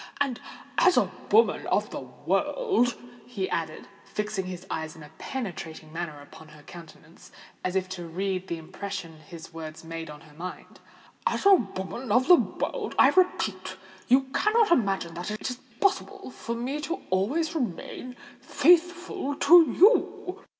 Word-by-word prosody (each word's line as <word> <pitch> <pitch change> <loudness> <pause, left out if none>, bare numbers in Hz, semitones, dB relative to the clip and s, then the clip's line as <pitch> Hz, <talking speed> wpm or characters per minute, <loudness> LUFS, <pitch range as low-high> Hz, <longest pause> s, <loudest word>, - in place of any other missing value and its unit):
And, 275 -4 0 0.4
as 370 - +5
a - - +3 0.2
woman 450 +2 +4
of - - 0
the - - -4
world," 385 - 0 0.3
he 200 -6 -3
added, 160 -2 -3 0.2
fixing 210 -3 -3
his 180 0 -7
eyes 160 -3 -4
in 160 - -12
a 150 - -13
penetrating 165 - -6
manner 165 -3 -5
upon 155 +2 -14
her 150 -1 -16
countenance, 165 0 -14 0.3
as 185 0 -2
if 190 -1 +1
to 175 -2 -6
read 190 +2 -2
the 170 - -3
impression 165 0 -7
his 160 +1 -12
words 160 -1 -8
made 165 0 -6
on 150 0 -10
her 155 -2 -17
mind,—"as 180 - -6
a 400 - +9
woman 210 - -1
of 250 +5 +4
the 360 - +9
world, 350 - 0
I - - +7
repeat, 190 - 0 0.3
you 260 +2 +6
cannot 435 -2 +3
imagine 195 - +1
that 175 +4 -5
it 215 +4 -3
is 250 - -7 0.2
possible 395 -3 0
for 235 -1 -5
me 260 +6 -3 0.3
always 260 - +1
to 325 -1 -3
remain 250 - -5 0.2
faithful 350 0 +2
to 335 +3 +7
you!" 385 -1 +3
200 Hz, 155 wpm, -27 LUFS, -, 0.4 s, a